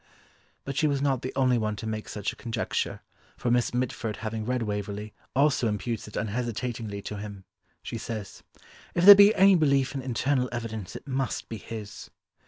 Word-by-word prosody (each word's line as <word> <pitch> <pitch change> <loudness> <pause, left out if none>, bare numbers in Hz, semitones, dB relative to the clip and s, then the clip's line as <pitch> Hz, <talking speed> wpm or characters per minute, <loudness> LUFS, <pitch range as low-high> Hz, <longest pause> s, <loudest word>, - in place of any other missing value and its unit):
But 135 - -4
she 155 +2 +2
was 140 -2 +1
not 135 -3 +1
the 130 - -4
only 130 -3 +3
one 105 -1 -1
to 105 - -7
make 110 -1 -4
such 105 0 -3
a - - -14
conjecture, 115 -1 -3 0.4
for 120 - -1
Miss 120 0 +2
Mitford 120 -3 -2
having 110 0 -4
read 125 0 0
Waverley 105 0 -4 0.2
also 140 -3 +3
imputes 110 +1 -3
it 105 - -11
unhesitatingly 110 -2 -3
to 105 - -5
him, 100 -1 -8 0.4
she - - -5
says, 110 -4 -6 0.5
"If 175 - +2
there 205 - +14
be 200 +2 +7
any 195 +1 +7
belief 140 -6 +3
in 135 - -3
internal 130 +1 0
evidence 110 -5 -5
it - - -9
must 135 -1 -2
be 115 - -4
his." 105 0 -8
120 Hz, 185 wpm, -27 LUFS, 105-135 Hz, 0.5 s, there